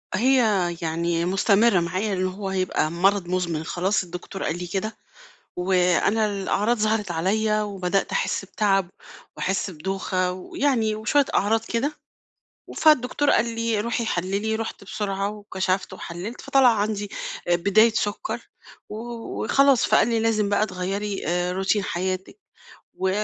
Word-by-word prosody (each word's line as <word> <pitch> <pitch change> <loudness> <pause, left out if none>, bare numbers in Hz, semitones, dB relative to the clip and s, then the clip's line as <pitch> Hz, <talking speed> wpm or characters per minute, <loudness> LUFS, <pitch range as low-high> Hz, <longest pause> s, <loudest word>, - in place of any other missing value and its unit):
هي 260 +6 +3 0.4
يعني 170 +1 -1
مستمِّرة 195 +2 +3
معايا 185 +5 -1
إن 185 0 0
هو 195 +1 -5
هيبقى 185 -4 0
مرَض 190 +2 +2
مُزمِن 175 -3 -1
خلاص 190 +5 0
الدكتور 180 +2 -7
قال 165 - -1
لي 180 0 -5
كده، 195 +5 -3 0.6
وأنا 180 +4 +2
الأعراض 210 +3 0
ظهرِت 215 -2 0
عليَّ، 215 +6 +1
وبدأت 195 -2 -1
أحس - - -1
بتعَب 195 -4 +1 0.5
وأحس 190 +1 -1
بدوخة 185 +2 -2
ويعني 220 +4 0
وشوية 235 +7 +2
أعراض 220 +3 +2
كده، 270 +6 -1 0.7
و - - -10
فالدكتور 290 -1 +3
قال 235 0 +2
لي 230 -2 0
روحي 235 +2 -1
حَلِّلي، 200 +4 -1
رُحت 225 -2 -5
بسرعة 195 0 -2
وكشفت 195 -2 -2
وحَلِّلت 180 +8 -7
فطلَع 270 -2 +4
عندي، 205 -1 -2 0.4
آآ 175 - +4
بداية 210 +6 +4
سكّر 205 -2 -2 0.5
و - - -7 0.5
وخلاص، 275 -2 +4
فقال - - +4
لي 230 -1 +1
لازم 220 -2 +1
بقى 205 +1 +2
تغيّري 195 +2 -3
آآ، 180 +1 0
روتين 195 +2 0
حياتِك 185 - -3 0.6
و 190 - -1
200 Hz, 135 wpm, -24 LUFS, 185-220 Hz, 0.7 s, فطلَع